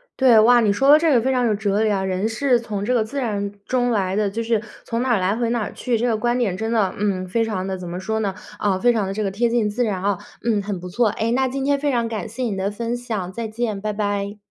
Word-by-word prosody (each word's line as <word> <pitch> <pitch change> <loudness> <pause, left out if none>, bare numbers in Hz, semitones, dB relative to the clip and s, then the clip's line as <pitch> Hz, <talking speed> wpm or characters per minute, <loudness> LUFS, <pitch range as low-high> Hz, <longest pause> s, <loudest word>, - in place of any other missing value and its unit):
对， 250 -4 +6
哇， 240 +2 +6
你 215 -3 +3
说 270 +7 +2
的 295 - +9
这 315 -1 +3
个 240 - +4
非 260 - 0
常 250 -1 +2
有 225 - +2
哲 205 0 0
理 215 - +2
啊， 195 -2 0
人 190 +2 -1
是 250 +3 +2
从 210 -4 -4
这 250 - +1
个 235 - +3
自 275 +6 -5
然 205 -5 -2
中 245 -1 +1
来 190 -4 0
的， 210 -1 +1
就 220 +4 -3
是 225 -2 0 0.2
从 230 0 -2
哪 260 - -1
儿 215 - +2
来 185 +3 +1
回 235 0 -1
哪 235 -1 0
儿 - - -6
去， 245 -2 -1
这 240 +3 0
个 230 - +2
观 240 +3 0
点 205 -7 0
真 220 +3 -3
的， 215 -5 +1
嗯， 190 -2 -1
非 225 +5 +1
常 195 -4 -3
地 190 -1 -3
怎 180 -1 -8
么 175 +1 -4
说 220 +3 -2
呢， 200 -3 -1 0.3
啊， 195 -2 +1
非 245 +3 +4
常 215 -4 0
地 195 - -3
这 215 - -3
个 200 - 0
贴 230 +5 0
近 230 -3 +1
自 235 +4 -1
然 200 -5 -1
啊。 200 0 0 0.3
嗯， 220 -3 +2
很 200 -2 -4
不 180 - -8
错， 220 +5 +1
哎， 225 +3 -1
那 260 +1 +1
今 270 +1 -3
天 285 0 +2
非 290 0 0
常 235 -2 0
感 225 -2 -4
谢 250 +4 -5
你 215 -5 -1
的 190 +1 -1
分 235 +3 -3
享， 220 -7 -4
再 230 +2 -4
见， 215 -3 -3
拜 215 - -2
拜。 205 0 -2
220 Hz, 325 characters per minute, -22 LUFS, 200-240 Hz, 0.3 s, 的